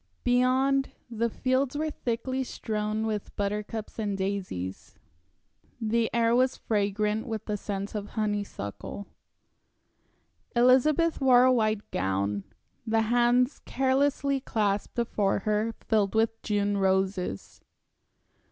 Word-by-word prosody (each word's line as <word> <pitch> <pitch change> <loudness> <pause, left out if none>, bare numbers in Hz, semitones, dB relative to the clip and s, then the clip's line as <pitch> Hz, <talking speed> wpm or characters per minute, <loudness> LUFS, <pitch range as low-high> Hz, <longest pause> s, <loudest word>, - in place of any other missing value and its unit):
Beyond, 260 +2 +2 0.2
the 230 +1 0
fields 260 +4 0
were 310 +1 -1
thickly 255 +1 -2
strewn 215 -2 -2
with 215 -2 -3
buttercups 210 +2 -3
and 205 -2 -1
daisies. 190 - -4 0.8
The 225 0 +1
air 230 0 +3
was 255 +1 +2
fragrant 210 +1 0
with 220 -2 -4
the 210 - -2
scent 200 -1 -4
of 205 -1 -4
honeysuckle. 205 - -3 1.5
Elizabeth 270 +7 +4
wore 250 -2 +6
a 255 0 +5
white 215 -3 0
gown; 95 +2 -1 0.4
the 225 -1 +1
hands 245 +2 +3
carelessly 275 +1 +1
clasped 210 -6 -1
before 210 -5 0
her 210 +1 +1
were 225 -1 -7
filled 210 -2 +2
with 225 0 +1
June 205 -1 0
roses. 190 - -1
220 Hz, 115 wpm, -28 LUFS, 205-250 Hz, 1.5 s, wore